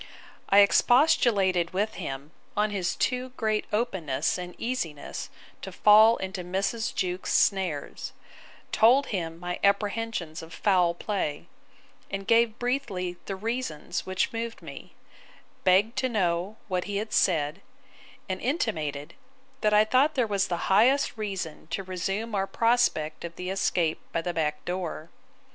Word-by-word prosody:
I 200 +1 +7
expostulated 200 - +3
with 210 +3 0
him 140 -4 -6 0.3
on 210 0 +2
his 185 -4 -1
too 250 0 -1
great 215 -1 0
openness 190 - -1
and 180 0 -7
easiness 200 - -4 0.3
to 190 - -7
fall 215 +4 +6
into 190 -1 -5
Mrs. 195 +5 -1
Jewkes's 180 0 -2
snares: 185 -8 0 0.6
told 250 +6 +5
him 165 -3 -3
my 175 0 -4
apprehensions 200 -4 0
of 165 +1 -10
foul 180 -4 +2
play; 175 -7 -3 0.6
and 195 0 -4
gave 230 0 +3
briefly 220 -9 -2
the 195 - -3
reasons 225 -5 -3
which 185 +3 -1
moved 230 0 -5
me: - - -10 0.7
begged 195 +6 +4
to 260 -1 0
know 190 -1 -1
what 180 -3 -1
he 205 0 -3
had 215 +1 -4
said; 160 0 +1 0.7
and 185 -1 -3
intimated, 160 - -2 0.5
that 215 - +3
I 210 +1 +5
thought 265 +7 +3
there 250 -3 +2
was 200 -3 0
the 175 -1 -2
highest 255 +8 +3
reason 195 -9 -5
to 195 - -3
resume 195 +4 -3
our 195 -1 0
prospect 230 -11 +1
of 170 -1 -7
the 180 +1 -4
escape 175 -4 0
by 165 - -1
the 175 - -2
back 150 -2 -2
door. 175 -3 -4
195 Hz, 140 wpm, -27 LUFS, 175-225 Hz, 0.7 s, I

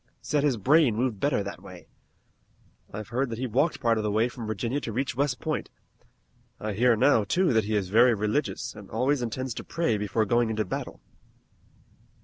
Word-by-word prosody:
Said 145 0 -1
his 140 -5 +2
brain 135 - +4
moved 115 -3 -1
better 140 -6 +1
that 100 - -7
way. - - -12 1.0
I've 105 +1 -7
heard 130 +3 -1
that 115 - -5
he 130 - -2
walked 135 +7 +1
part 115 -3 +2
of - - -2
the 105 - 0
way 110 +4 +2
from 115 -1 -7
Virginia 115 +6 -2
to 115 - -4
reach 130 +3 -2
West 135 -1 0
Point. 155 -1 -3 0.9
I 110 -1 -3
hear 120 +3 +3
now, 110 0 +4
too, 175 - +1
that 110 -2 +2
he 110 +1 -1
is 100 -3 -1
very 115 +3 +5
religious, 105 +1 -2
and 105 -2 -12
always 130 +5 0
intends 125 +2 -3
to - - -7
pray 120 -11 -1
before 105 +2 0
going 120 +2 +2
into 110 -1 -1
battle." - - -5
115 Hz, 195 wpm, -27 LUFS, 105-130 Hz, 1.0 s, very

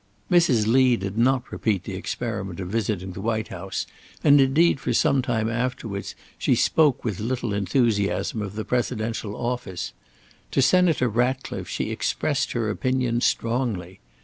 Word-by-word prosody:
Mrs. 155 -11 +4
Lee 125 +1 +4
did 100 0 -4
not 125 +2 +1
repeat 100 -5 -1
the 100 - -6
experiment 100 -2 -4
of 90 -2 -4
visiting 100 -3 -2
the 95 - -7
White 110 0 -1
House, - - -4 0.4
and 145 -1 +7
indeed 140 +3 +3
for 125 - -1
some 135 +3 +3
time 115 -4 -1
afterwards 115 -4 -3 0.2
she - - +3
spoke 150 -7 +2
with 105 -5 -2
little 120 0 -2
enthusiasm 100 +1 0
of 105 -1 -5
the 110 - -4
presidential 115 -3 -2
office. 120 -7 -4 0.6
To - - -1
Senator 170 -6 +4
Ratcliffe 125 +4 -1
she - - -2
expressed - - -1
her 110 -2 0
opinions 125 0 0
strongly. 115 -7 -1
115 Hz, 145 wpm, -24 LUFS, 105-130 Hz, 0.6 s, and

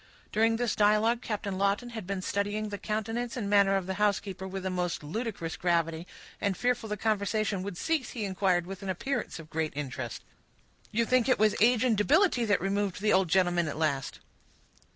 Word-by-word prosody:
During 225 +1 +3
this 235 -1 0
dialogue 215 +3 +3
Captain 205 -4 -3
Lawton 200 +5 +1
had 220 -6 -7
been 195 -1 -3
studying 205 +2 -1
the 205 -1 -5
countenance 225 +3 -3
and 215 -5 -2
manner 200 -1 +4
of 195 -2 0
the 190 - -2
housekeeper, 195 -2 0
with 190 0 -5
a 190 - -1
most 180 -3 -2
ludicrous 170 -1 -4
gravity; 170 -1 0 0.3
and, 200 -2 0
fearful 245 -3 0
the 210 - -2
conversation 210 -1 0
would 190 -2 -5
cease, 320 - -1
he 225 -4 -4
inquired, 185 -2 +1
with 195 +1 -8
an 195 - -5
appearance 245 +8 -2
of 160 -2 -11
great 160 -1 -1
interest,— 140 -3 -5 0.7
"You 230 +2 +1
think 255 +1 +2
it 255 - +4
was 215 0 +4
age 240 +1 +5
and 245 -4 +3
debility 265 - +3
that 205 -3 +2
removed 195 +1 -1
the 210 +1 +2
old 190 -1 +4
gentleman 175 -1 +2
at 155 - -4
last?" 140 -4 -1
200 Hz, 195 wpm, -29 LUFS, 185-225 Hz, 0.7 s, age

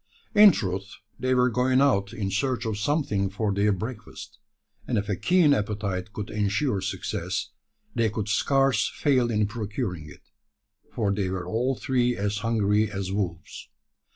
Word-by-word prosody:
In 210 -1 +9
truth, 95 - -4 0.2
they 130 0 +1
were 125 0 +3
going 130 +2 +2
out 100 -8 +2
in 105 -4 -3
search 125 +4 -1
of 110 -2 -2
something 105 -7 0
for 100 +1 -1
their 100 +2 +2
breakfast; 105 0 -6 0.5
and 120 - 0
if 100 0 -1
a 100 - 0
keen 175 - +4
appetite 100 -4 -2
could 105 -1 -6
ensure 105 +2 0
success, 95 +1 -3 0.4
they 115 -2 +1
could 105 -1 -4
scarce 135 +1 +2
fail 130 -4 +1
in 105 -2 +1
procuring 100 - -4
it: 95 +6 -17 0.6
for 105 -5 0
they 100 -2 -1
were 95 -1 -3
all 125 +7 0
three 125 -1 0
as 100 +1 -1
hungry 105 -1 +1
as 95 -1 -4
wolves. 90 -6 -4
105 Hz, 155 wpm, -26 LUFS, 100-125 Hz, 0.6 s, In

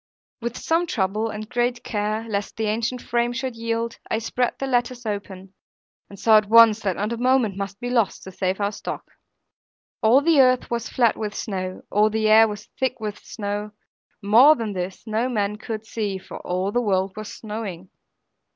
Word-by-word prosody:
With 235 +1 -4
some 335 +2 0
trouble, 210 - -1
and 215 0 -6
great 240 +1 -1
care, 215 +1 -2
lest 200 -2 -3
the 220 - -1
ancient 230 +3 -1
frame 240 0 0
should 260 -1 -3
yield, 230 0 -3
I - - +1
spread 240 +2 -1
the 270 - -3
lattice 245 -1 -1
open; 195 -2 -5 0.6
and 200 - -12
saw 220 -1 +6
at 210 - -7
once 225 -1 +7
that 195 -4 -1
not 210 +3 -2
a - - -4
moment 250 -4 +2
must 195 0 -5
be 245 0 -4
lost, 230 -5 +1
to 190 - -9
save 185 +1 -2
our 200 0 0
stock. - - -7 0.9
All 235 +5 +5
the 310 -2 +5
earth 255 -1 +3
was 235 -1 -2
flat 235 -3 +2
with 210 -1 -4
snow, 185 -3 -4
all 210 +1 +4
the 220 0 0
air 220 +1 +7
was 210 -1 -7
thick 260 -1 0
with 210 -2 -5
snow; 205 -1 -5 0.5
more 240 +10 +7
than 225 -6 -4
this 185 +2 -5
no 225 +3 -1
man 210 -3 -1
could 220 0 -6
see, 210 -4 -3
for 190 - -10
all 185 +2 -2
the 245 - +1
world 190 -3 0
was 215 0 -7
snowing. 210 -5 -7
220 Hz, 190 wpm, -23 LUFS, 205-240 Hz, 0.9 s, once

